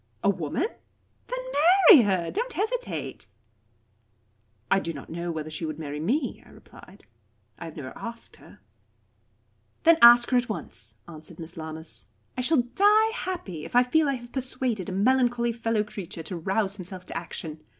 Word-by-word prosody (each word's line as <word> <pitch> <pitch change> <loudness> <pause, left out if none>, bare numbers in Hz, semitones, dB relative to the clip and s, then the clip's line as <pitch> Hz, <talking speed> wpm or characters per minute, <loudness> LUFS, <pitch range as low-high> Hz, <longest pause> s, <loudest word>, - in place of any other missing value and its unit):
"A 200 - +4
woman? 175 - -2 0.6
Then - - -4 0.5
marry 365 - +11
her. 185 -4 0
Don't 475 +3 -3
hesitate." 455 - -3 1.4
"I 195 - +5
do 165 -3 -4
not 140 0 -10
know 170 +1 -3
whether 155 -1 -5
she 155 - -5
would 155 -2 -4
marry 150 -2 -5
me," 255 - -1
I - - -19
replied. 195 +2 -16 0.5
"I 170 - -7
have 160 - -9
never 130 -4 -7
asked 230 0 -8
her." - - -17 1.2
"Then 330 0 +6
ask 240 +1 +8
her 250 - +4
at 245 -1 0
once," 110 - -7
answered 160 0 -11
Miss 165 +1 -8
Lammas. 160 -3 -7 0.3
"I 255 - -2
shall 255 0 +2
die 425 +3 +5
happy 345 - -5
if - - -8
I 245 - +7
feel 300 +4 +2
I 275 - +1
have 240 -1 -10
persuaded 255 -6 -2
a - - -4
melancholy 240 +3 +2
fellow 225 -2 0
creature 190 -5 -8
to 180 - -5
rouse 195 +4 -1
himself 185 -1 -8
to - - -8
action. 160 -2 -6
205 Hz, 170 wpm, -26 LUFS, 165-255 Hz, 1.4 s, marry